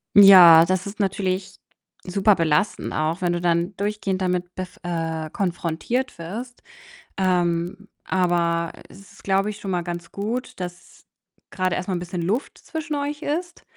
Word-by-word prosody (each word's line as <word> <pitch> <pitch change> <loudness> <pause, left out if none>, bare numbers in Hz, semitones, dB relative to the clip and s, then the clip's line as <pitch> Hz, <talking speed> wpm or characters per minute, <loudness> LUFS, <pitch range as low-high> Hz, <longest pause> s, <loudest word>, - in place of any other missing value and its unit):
Ja, 180 -5 +10
das 185 0 -1
ist 200 +2 -8
natürlich 190 -1 -2 0.5
super 195 +3 +3
belastend 165 +3 0
auch, 160 +4 -1
wenn 175 -1 +1
du 175 - -2
dann 175 +2 0
durchgehend 200 -2 -2
damit 180 -1 -1
bef 185 -1 -7
äh, 165 -2 -3
konfrontiert 185 +6 -2
wirst. 230 +9 -7 0.6
Ähm, 180 +1 0 0.2
aber 170 -2 0 0.2
es 195 0 -15
ist, - - -18
glaube 195 +1 +1
ich, 210 - -6
schon 195 -2 -5
mal 175 -1 -1
ganz 175 0 -6
gut, 220 +3 -4
dass 180 0 -9 0.4
grade 185 -1 -1
erst 180 - -4
mal 185 - -1
'n - - -2
bisschen 175 0 -5
Luft 205 +10 -2
zwischen 315 -2 -5
euch 290 +1 -3
ist, 340 +4 -4
185 Hz, 155 wpm, -23 LUFS, 175-205 Hz, 0.6 s, Ja